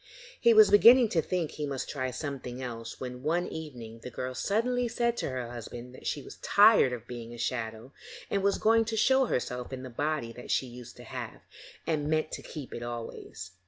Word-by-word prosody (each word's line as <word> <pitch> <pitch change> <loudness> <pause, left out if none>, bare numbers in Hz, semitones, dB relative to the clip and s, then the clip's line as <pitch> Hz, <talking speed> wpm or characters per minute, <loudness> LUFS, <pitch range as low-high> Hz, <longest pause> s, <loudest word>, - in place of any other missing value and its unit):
He 235 - +5
was 215 -2 +7
beginning 235 +3 +8
to 165 - +2
think 170 -2 -2
he 150 -1 -4
must 135 -2 -3
try 130 -3 -2
something 130 -2 -5
else 115 -3 -6
when 125 -1 -6
one 170 +5 0
evening 120 -8 -8
the - - -7
girl 125 +1 -4
suddenly 240 - 0
said 235 0 0
to - - -2
her 125 -2 -4
husband 120 +1 -8
that - - -9
she 145 - -2
was - - -11
tired 205 - +6
of 120 -2 -5
being 120 -1 -8
a - - -11
shadow, 115 +1 -3 0.3
and 200 - 0
was 200 +1 +2
going 225 +1 +4
to 220 0 -3
show 265 +4 +4
herself 125 - -2
in 130 -1 -6
the 130 - -8
body 145 -2 -2
that 125 - -11
she - - +2
used 125 -1 -11
to - - -11
have, - - -7 0.4
and 150 -2 -1
meant 155 0 +1
to - - -5
keep 145 -5 -8
it 120 - -5
always. 120 -6 -7
135 Hz, 210 wpm, -29 LUFS, 120-200 Hz, 0.4 s, beginning